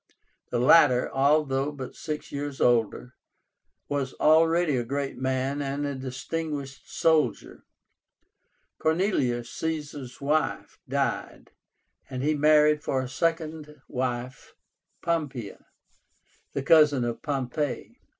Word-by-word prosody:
The 120 - -1
latter, 125 0 +5
although 140 0 +2
but 135 -3 -7
six 155 -2 -5
years 145 -1 -5
older, 120 +1 +1 0.7
was 140 -2 -2
already 160 0 +4
a 120 - 0
great 140 +3 -3
man 130 +2 -1
and 140 +1 -2
a 140 - -2
distinguished 135 +2 -5
soldier. 160 -2 +1 1.1
Cornelia, 160 - +1
Caesar's 145 -3 -5
wife, 150 +3 -1
died, - - -2 0.6
and 130 -1 -4
he 155 +2 +2
married 150 0 +4
for 130 - 0
a - - -5
second 155 +1 -2
wife 125 -1 -4 0.5
Pompeia, 145 -10 -3 0.9
the 140 - -2
cousin 150 -4 +5
of 120 -1 -4
Pompey. 140 0 -3
140 Hz, 105 wpm, -26 LUFS, 130-155 Hz, 1.1 s, latter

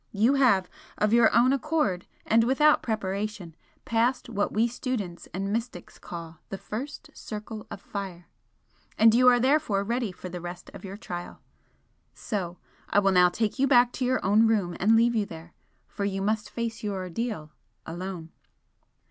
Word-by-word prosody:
You 220 +6 +3
have, 240 -10 +4 0.3
of 210 +1 +1
your 235 -1 +6
own 245 +3 +4
accord, 275 - 0 0.2
and 225 +1 +4
without 295 +5 +4
preparation, 200 -5 -3 0.3
passed 235 +2 +1
what 205 -3 -1
we 225 +3 +2
students 230 -8 -4
and 195 +2 -3
mystics 230 -6 -5
call 165 -2 -8
'the 195 - -4
first 285 +9 -7
circle 215 0 -7
of - - -7
fire,' 190 -4 -7 0.7
and 225 0 +6
you 250 +2 +5
are 245 -1 +7
therefore 255 -6 +2
ready 235 0 -1
for 185 - -9
the 180 -1 -7
rest 175 +1 -8
of - - -11
your 195 0 -7
trial. 175 -5 -7 0.8
So 180 -5 -4 0.3
I - - +1
will 195 -1 +4
now 180 -1 +6
take 215 +7 -2
you 275 - +4
back 245 -2 +5
to 255 - -2
your 255 -4 0
own 215 +4 +5
room 200 -6 +1
and 215 +4 +4
leave 235 +1 +4
you 215 -3 0
there, 165 -1 -11 0.3
for 205 - -5
you 195 -1 -1
must 215 +1 -1
face 230 -2 -4
your 205 -2 -2
ordeal 185 -3 -4 0.3
alone." 175 -1 -6
210 Hz, 170 wpm, -27 LUFS, 185-235 Hz, 0.8 s, are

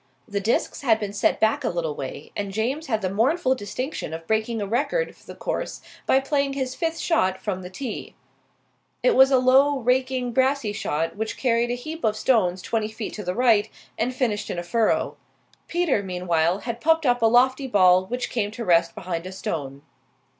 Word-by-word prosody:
The 200 -1 -2
discs 215 +4 0
had 225 -5 +3
been 205 -2 -4
set 205 - +1
back 225 +6 +2
a - - +1
little 165 -3 -2
way, 140 +2 -7
and 200 -1 -3
James 255 +10 -2
had 220 -5 -1
the 185 - +1
mournful 260 - +2
distinction 250 - -4
of 165 0 -9
breaking 220 +3 0
a 205 - -2
record 365 - -1
for - - -23
the - - -9
course - - -4 0.3
by 265 - +5
playing 280 0 0
his 260 -2 -2
fifth 330 0 -2
shot 190 - +1
from 190 -1 -3
the 180 - -8
tee. 240 +3 -6 0.9
It - - +4
was 265 0 +7
a 265 - +4
low, 265 +3 +4
raking 255 0 0
brassey 260 -4 +1
shot, 165 -2 -2
which 220 +1 -3
carried 240 -2 +1
a 245 - 0
heap 310 +6 -7
of 215 -1 +1
stones 185 -7 +2
twenty 220 -2 -1
feet 220 0 -6
to 210 - -6
the 180 0 -3
right 230 -4 +3 0.3
and 250 - -1
finished 235 -5 -1
in - - -3
a 175 - -3
furrow. 220 +5 0 0.5
Peter, 340 -10 +1
meanwhile, 180 -1 0
had 235 -1 -5
popped 325 0 +3
up 245 -2 +2
a 225 - +5
lofty 260 +3 +3
ball 185 -5 +4
which 245 +3 -3
came 210 -4 -1
to 230 +2 -6
rest 170 -2 +3
behind 175 -1 -4
a - - -7
stone. 140 -7 -5
225 Hz, 200 wpm, -24 LUFS, 190-260 Hz, 0.9 s, was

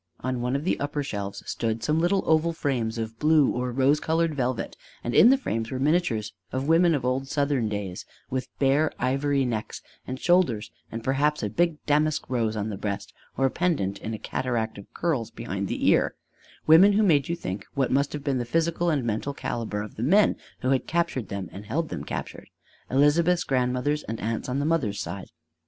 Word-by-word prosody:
On 130 -1 -2
one 125 +2 0
of 140 - -1
the 185 - 0
upper 145 0 -2
shelves 100 -6 -5
stood 115 -1 -2
some 155 +1 +1
little 180 +3 +2
oval 160 +1 +3
frames 120 -7 -1
of 115 0 -5
blue 150 -2 +4
or 125 +1 -2
of 120 - -7
rose 140 +3 +4
colored 165 0 +1
velvet; 130 -3 -2 0.3
and 120 - -2
in 230 - +8
the 270 - +5
frames 115 - -3
were 130 - -3
miniatures 135 -7 +1 0.2
of 130 +2 -2
women 165 +1 +5
of 130 -4 -2
old 130 +2 0
Southern 140 -5 0
days 100 -3 -4 0.2
with 130 -1 -3
bare 140 +3 +3
ivory 135 +2 +1
necks 110 -3 -4 0.2
and 130 +1 -4
shoulders 170 - +2 0.2
and 115 0 -5
perhaps 145 +2 +1
a 105 - -2
big 165 +5 0
damask 150 +1 +1
rose 115 -3 0
on 105 0 -2
the 100 -2 -5
breast 100 -1 -4 0.2
or 135 - +3
pendent 140 - 0
in 110 +1 -4
a - - -5
cataract 110 -1 -2
of 100 - -13
curls 145 -10 -1
behind 100 -4 -4
the - - -1
ear: - - +3 0.5
women 175 +6 +7
who 215 +2 +3
made 150 -8 +3
you 170 - 0
think 95 - -5
what 135 -2 +1
must 140 +2 +2
have 150 -2 -5
been 140 -3 0
the - - -1
physical 165 +6 0
and 145 -5 +1
mental 115 +5 -2
calibre 105 -5 -3
of 105 - -13
the - - -4
men 195 - +4 0.3
who 130 - +1
had 135 - +1
captured 165 - -1
them 100 -1 -4
and 100 +1 -10
held 155 +8 -1
them - - -5
captured: - - -6 0.4
Elizabeth's 160 +6 +3
grandmothers 130 +3 0
and 110 0 -5
aunts 115 +3 -3
on 125 - -1
the 140 - 0
mother's 135 -12 0
side. 100 -2 -5
130 Hz, 205 wpm, -26 LUFS, 115-155 Hz, 0.5 s, in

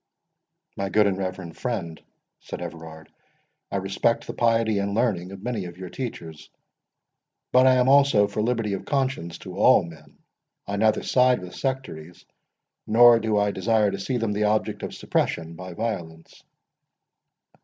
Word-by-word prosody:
"My 100 0 -3
good 105 +1 +3
and 100 -2 +1
reverend 95 -3 -5
friend," 95 -10 -4 0.4
said - - -8
Everard, 80 -2 -9 0.6
"I - - -5
respect 95 +4 0
the - - -6
piety 115 -3 +1
and 100 0 -2
learning 100 -6 0
of 100 0 -10
many 115 -5 -3
of 85 0 -9
your 90 -1 -8
teachers; 85 - -7 1.0
but 130 +1 +5
I 130 - +6
am 125 0 +3
also 135 -7 +5
for 105 +1 -3
liberty 115 -2 -1
of 95 - -4
conscience 130 - -2
to - - -10
all - - +5
men. 80 -2 -13 0.5
I 100 0 -3
neither 110 +1 +2
side 125 -1 +3
with 90 -1 -10
sectaries, 130 - -5 0.6
nor 115 +1 +7
do 110 -1 0
I 105 0 +2
desire 105 +1 +1
to 100 - -5
see 125 +5 -2
them 115 -3 -1
the 105 +1 0
object 105 +1 0
of - - -6
suppression 85 -1 -2
by 90 +1 -9
violence." 85 -8 -5
105 Hz, 160 wpm, -24 LUFS, 90-115 Hz, 1.0 s, nor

